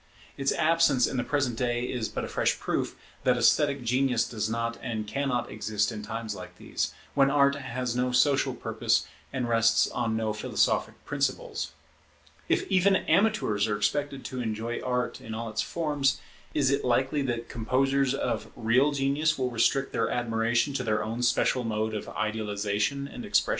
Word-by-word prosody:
Its 135 0 0
absence 155 -5 +3
in 135 - -2
the 125 - +1
present 130 -6 -1
day 120 -1 0
is 120 -4 -2
but - - -4
a - - -6
fresh - - 0
proof - - -2 0.3
that - - +3
esthetic 140 -3 +3
genius 125 0 +2
does 110 -2 -2
not 115 +1 -2
and 110 -3 -3
cannot 130 +2 -1
exist 105 0 -1
in 110 -2 -6
times 110 +1 -4
like - - -10
these, - - -2 0.2
when 135 -1 +4
Art 140 0 +4
has 130 -3 -3
no 125 0 +1
social 135 0 +3
purpose 115 0 0 0.3
and 130 -3 -2
rests 115 -1 +4
on 115 -2 -1
no 110 -1 -1
philosophic 105 - 0
principles. - - -2 0.8
If - - +2
even 190 +1 +4
amateurs 190 - +2
are 105 -1 0
expected 135 +6 -1
to 130 -1 -4
enjoy 115 +1 -3
Art 125 -1 -2
in 110 -1 -6
all 115 0 -4
its 110 - -1
forms, 145 -4 0 0.4
is 140 -2 +3
it 140 0 +1
likely 130 +4 +1
that 120 -3 -2
composers 135 +3 +1
of 115 -5 -2
real 125 +5 +3
genius 140 +3 +1
will 130 -2 -1
restrict 135 +4 +1
their 115 - +1
admiration 120 +2 +1
to 130 - -1
their 110 -2 0
own 115 +2 -3
special 125 +1 +2
mode 110 -1 -1
of 105 - -4
idealization 105 +4 -1
and - - -8
expression? - - +2
120 Hz, 175 wpm, -28 LUFS, 110-135 Hz, 0.8 s, when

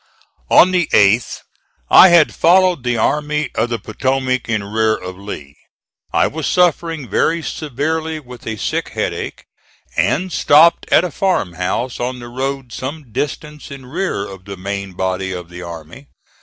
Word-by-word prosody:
On 185 - +6
the 180 -3 +1
8th 105 +4 +3 0.5
I 190 - +9
had 170 -3 +5
followed 180 -3 +3
the 125 -1 0
Army 150 +4 0
of 120 - 0
the 120 - -1
Potomac 130 +2 -2
in 110 -2 0
rear 110 +2 +1
of 90 0 -8
Lee. 75 -8 -9 0.6
I - - +3
was 155 -1 -3
suffering 165 -5 +1
very 165 - +1
severely 155 +3 -3
with 125 -5 -13
a 110 -1 -3
sick - - -2
headache, - - -4 0.5
and 185 -1 0
stopped 155 +4 +4
at - - +5
a 180 - -3
farmhouse 115 - -1
on 125 +1 -3
the 120 -1 -9
road 135 0 -4
some 140 -1 -6
distance 150 +4 -5
in 135 -2 -10
rear 160 - -3
of 95 -1 -11
the 100 -1 -8
main 100 0 -5
body 95 +1 -2
of 90 -2 -7
the 90 +1 -9
army. 85 - -10
130 Hz, 155 wpm, -18 LUFS, 100-155 Hz, 0.6 s, I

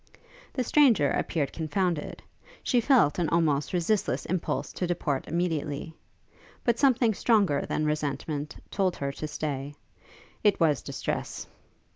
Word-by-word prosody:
The 255 - 0
stranger 245 - +4
appeared 145 -5 -1
confounded: 170 0 -2 0.4
she 245 - +2
felt 230 - +4
an 165 -3 +1
almost 155 -4 +1
resistless 185 +4 0
impulse 185 -2 -2
to 180 - -2
depart 155 -6 -1
immediately; 160 -3 -2 0.7
but 235 -1 +1
something 250 -5 +4
stronger 200 -10 +2
than 155 - -1
resentment 150 0 -2 0.2
told 190 -3 +1
her 140 0 -3
to 155 +2 -5
stay: 145 -2 -4 0.7
it 210 -2 +3
was 150 -6 +3
distress! - - -4
165 Hz, 125 wpm, -28 LUFS, 145-200 Hz, 0.7 s, stranger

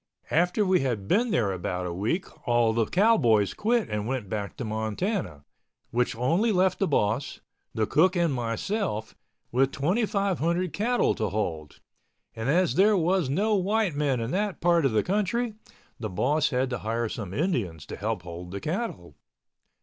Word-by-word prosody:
After 180 +6 +2
we 185 -1 +3
had 115 -7 -2
been 235 - +2
there 110 - +1
about 90 0 -3
a 85 - -3
week 110 - -1 0.2
all 120 -2 +3
the 115 -1 +1
cowboys 120 - +3
quit 230 +1 +1
and 105 0 -3
went 125 -6 -3
back 105 -1 -4
to 130 - -4
Montana, 110 - -2 0.5
which 125 +1 0
only 165 - +2
left 185 -1 +2
the 195 - +2
boss, 115 -1 0 0.4
the 110 - +1
cook 180 - +3
and 170 -4 +2
myself 120 - -2 0.4
with 130 +2 +2
2,500 185 -1 0
cattle 240 +4 +1
to 110 -2 -2
hold, 80 -7 -4 0.5
and 115 +3 -3
as 180 +4 +3
there 205 +2 +4
was 175 -3 +1
no 205 +10 +1
white 205 -1 +1
men 140 -3 0
in 115 +2 -3
that 205 0 -1
part 170 -2 +3
of 135 - +3
the 110 -1 +2
country, 210 +4 0 0.5
the 110 -2 -3
boss 145 - +1
had 130 0 0
to 125 - -2
hire 115 +2 -1
some 105 -4 -6
Indians 100 - -2
to - - -7
help 105 -2 -3
hold 90 0 -8
the 100 +2 -5
cattle. 150 - -4
135 Hz, 170 wpm, -27 LUFS, -, 0.5 s, there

